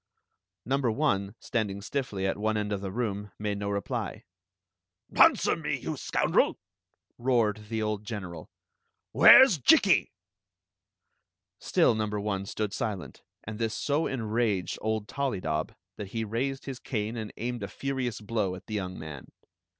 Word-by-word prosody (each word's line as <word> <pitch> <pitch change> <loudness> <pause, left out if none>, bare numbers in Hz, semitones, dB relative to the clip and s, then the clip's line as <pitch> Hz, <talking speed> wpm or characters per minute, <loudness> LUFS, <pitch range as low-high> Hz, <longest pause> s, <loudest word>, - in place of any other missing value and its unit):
" - - -55
Number 135 0 +1
one, 105 -6 0
standing 105 -5 -2
stiffly 105 -3 -3
at 95 - -1
one 110 +1 0
end 105 0 -2
of 100 -1 -2
the 100 - -4
room, 105 -2 -3
made 105 -1 -2
no 100 0 -2
reply. 100 0 -3 0.9
"Answer - - +5
me. - - -2
you - - -4
scoundrel!" - - +1 0.6
roared 115 -4 +1
the 110 -1 -1
old 105 -1 -1
een 105 -3 -3
eral. 85 -3 -8 0.6
"Where 260 - +10
's 180 - -1
Jikki?" 125 - +5 1.5
Still - - +3
number 105 -1 -2
one 100 -1 -2
stood 105 -1 -3
silent, 100 -5 -4 0.2
and 110 +1 -7
this 115 -1 -1
so 145 +3 0
enraged 110 -5 -1
old 110 -1 -1
Tollydob 90 - -2 0.2
that 105 - -5
he 115 +3 -3
raised 130 +5 -2
his 135 -3 -6
cane 110 -3 -3
and 110 -2 -5
aimed 120 0 -3
a 100 - -3
furious 130 -4 -3
blow 105 -4 -1
at 90 0 -12
the 110 - -8
young 95 -3 -3
man. 75 -4 -9
105 Hz, 155 wpm, -28 LUFS, 100-120 Hz, 1.5 s, Where